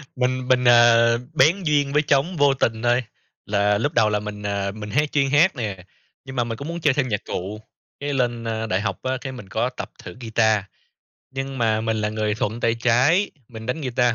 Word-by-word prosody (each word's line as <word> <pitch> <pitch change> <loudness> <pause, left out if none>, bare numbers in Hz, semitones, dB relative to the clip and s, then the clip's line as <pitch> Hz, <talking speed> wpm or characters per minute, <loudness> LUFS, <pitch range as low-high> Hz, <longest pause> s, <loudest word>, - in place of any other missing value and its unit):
Mình, 130 0 -1
mình, 125 -1 +3
à, 115 -1 +6 0.2
bén 170 +8 +3
duyên 145 -2 +1
với 150 - +4
trống 150 +4 +1
vô 145 -1 +4
tình 115 -4 -1
thôi 120 +1 +2 0.4
là 100 0 +2
lúc 145 +8 -1
đầu 105 - +3
là 105 0 0
mình, 105 0 -7
à, 100 -1 -2
mình 105 0 -8
hát 150 +5 0
chuyên 140 -2 +1
hát 155 +5 +4
nè, 100 -6 -5 0.4
nhưng 130 0 -8
mà 120 - +1
mình 115 -1 -5
cũng 140 +3 -7
muốn 170 0 -5
chơi 145 -4 +3
thêm 135 -2 0
nhạc 105 -2 -2
cụ, 100 +4 -5 0.4
cái 145 0 -3
lên, 120 -3 -1
ơ, 110 0 -3
đại 95 0 0
học 100 -3 -3
á 130 0 -1
cái 135 - -5
mình 125 -7 -10
có 115 +6 0
tập 130 - -8
thử - - -9
guitar. 110 -3 +2 0.7
Nhưng 135 0 -5
mà 110 -2 +1
mình 110 0 -1
là 105 0 -1
người 105 -1 -1
thuận 110 +2 -3
tay 115 0 +2
trái, 125 - +2 0.2
mình 110 -1 -9
đánh 125 +6 -2
guitar 125 -3 +1
120 Hz, 225 wpm, -22 LUFS, 110-135 Hz, 0.7 s, à